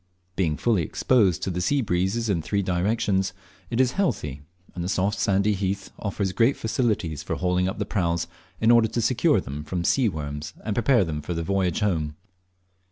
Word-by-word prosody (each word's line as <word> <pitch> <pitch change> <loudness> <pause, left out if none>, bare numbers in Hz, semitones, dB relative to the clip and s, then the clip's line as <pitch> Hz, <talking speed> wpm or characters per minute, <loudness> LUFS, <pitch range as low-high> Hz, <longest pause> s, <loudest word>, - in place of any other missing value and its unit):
Being 80 -5 0
fully 110 -6 +2
exposed 95 - +2
to 95 - -1
the 90 0 -2
sea 140 +9 +2
breezes 95 +4 0
in 95 -6 +1
three 100 +5 -1
directions 95 +1 0 0.4
it 115 - -2
is 130 -1 +4
healthy, 75 - -1 0.3
and 85 - -4
the 90 - -2
soft 100 +2 0
sandy 100 0 +2
heath 95 0 -3
offers 100 -2 -2
great 115 +7 +2
facilities 110 - -1
for - - -3
hauling 90 0 +1
up 95 - -3
the - - -2
praus, 85 -4 0 0.3
in 110 +1 +4
order 115 -1 +6
to 120 - -3
secure 115 - +3
them 70 +3 -6
from 85 +3 -3
sea 120 +6 +3
worms 75 -3 -6
and 105 -2 -1
prepare 120 -1 +4
them 75 -3 -3
for 85 +3 -4
the 85 - -2
homeward 95 -1 0
voyage. 80 -8 0
95 Hz, 190 wpm, -25 LUFS, 85-110 Hz, 0.4 s, order